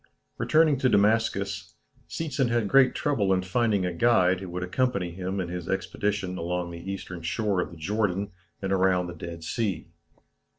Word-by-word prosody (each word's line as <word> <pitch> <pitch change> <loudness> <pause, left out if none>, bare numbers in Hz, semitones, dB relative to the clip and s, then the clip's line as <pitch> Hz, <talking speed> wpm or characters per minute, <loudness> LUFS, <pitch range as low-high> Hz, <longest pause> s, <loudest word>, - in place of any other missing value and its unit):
Returning 155 -2 +4
to 130 - +3
Damascus, 100 -5 +1 0.3
Seetzen 145 -6 -1
had 115 -3 +1
great 130 +3 +5
trouble 110 -10 +1
in 95 -1 +2
finding 100 0 +1
a 90 - -2
guide 95 -3 +3
who 95 -1 -7
would 90 +1 -4
accompany 100 -2 0
him 95 +2 -4
in 90 - -2
his 90 -1 -5
expedition 95 -1 -2
along 90 +1 -2
the 85 +3 -6
eastern 90 -2 -6
shore 90 +3 0
of - - -4
the 85 - -12
Jordan, 100 +2 -1 0.3
and 95 0 0
around 95 -1 +3
the 90 - -6
Dead 85 0 -8
Sea. 85 -1 -2
95 Hz, 170 wpm, -27 LUFS, 90-110 Hz, 0.3 s, great